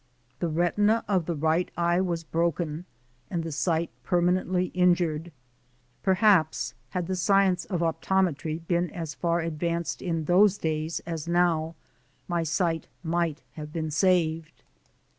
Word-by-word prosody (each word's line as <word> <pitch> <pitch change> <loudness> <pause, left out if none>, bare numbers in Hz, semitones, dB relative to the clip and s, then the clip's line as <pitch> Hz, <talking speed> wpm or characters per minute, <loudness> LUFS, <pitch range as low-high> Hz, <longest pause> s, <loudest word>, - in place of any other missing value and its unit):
The 175 - 0
retina 205 +7 +2
of 185 -5 +1
the 170 - -1
right 160 +4 +1
eye 175 +1 +2
was 170 -3 -2
broken 165 0 -1 0.4
and 170 -3 -2
the 165 - -4
sight 160 +2 0
permanently 180 0 +1
injured. 175 -3 +2 0.7
Perhaps 190 -5 +3 0.2
had 180 -2 -2
the 185 +2 -2
science 190 -1 +3
of 180 -4 -2
optometry 165 -1 0
been 175 0 +1
as 165 -6 -5
far 170 +5 0
advanced 165 +1 -2
in 165 -4 -2
those 195 +4 +5
days 160 -1 -2
as 165 -2 -5
now, 170 -2 +1 0.5
my 175 -1 0
sight 165 0 0 0.2
might 165 -2 -1
have 150 -1 -8
been 155 -1 -3
saved. 165 -2 +1
170 Hz, 135 wpm, -27 LUFS, 160-180 Hz, 0.7 s, those